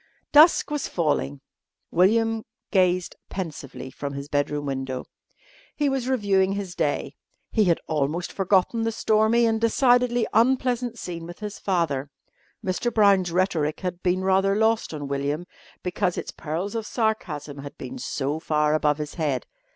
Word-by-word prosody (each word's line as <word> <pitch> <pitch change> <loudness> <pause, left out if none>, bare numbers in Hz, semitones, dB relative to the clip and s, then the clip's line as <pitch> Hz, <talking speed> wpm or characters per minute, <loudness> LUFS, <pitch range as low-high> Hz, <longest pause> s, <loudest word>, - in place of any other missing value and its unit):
Dusk 305 +1 +6
was 295 -2 -1
falling. 145 -4 -1 0.5
William 225 +5 +3 0.3
gazed 185 -2 +2
pensively 150 -7 -6
from 140 +1 -5
his 140 0 -6
bedroom 145 0 -1
window. 135 -2 -3 0.7
He 290 -2 +1
was 265 -2 -1
reviewing 195 -6 +2
his 200 -3 -4
day. 145 -3 -1 0.4
He 215 -2 +3
had 170 -2 +3
almost 155 +3 -1
forgotten 195 +4 +2
the 225 0 0
stormy 220 +1 +3
and 225 -1 +1
decidedly 245 0 +3
unpleasant 245 0 +2
scene 170 -4 -6
with 175 - -9
his 210 -1 -6
father. 160 -8 0 0.6
Mr. 190 +6 0
Brown's 200 -5 +4
rhetoric 165 -4 0
had 180 -1 -4
been 185 +1 +1
rather 195 +1 +3
lost 220 +1 +2
on 145 -3 -5
William, 140 +4 -2 0.4
because 180 0 -1
its - - -4
pearls 170 +6 -4
of 225 -1 -3
sarcasm 155 - -2
had 140 0 -9
been 260 - -7
so 145 - -2
far 150 -1 +1
above 150 -1 +2
his 150 -1 -5
head. 150 -6 -1
185 Hz, 150 wpm, -25 LUFS, 150-220 Hz, 0.7 s, Dusk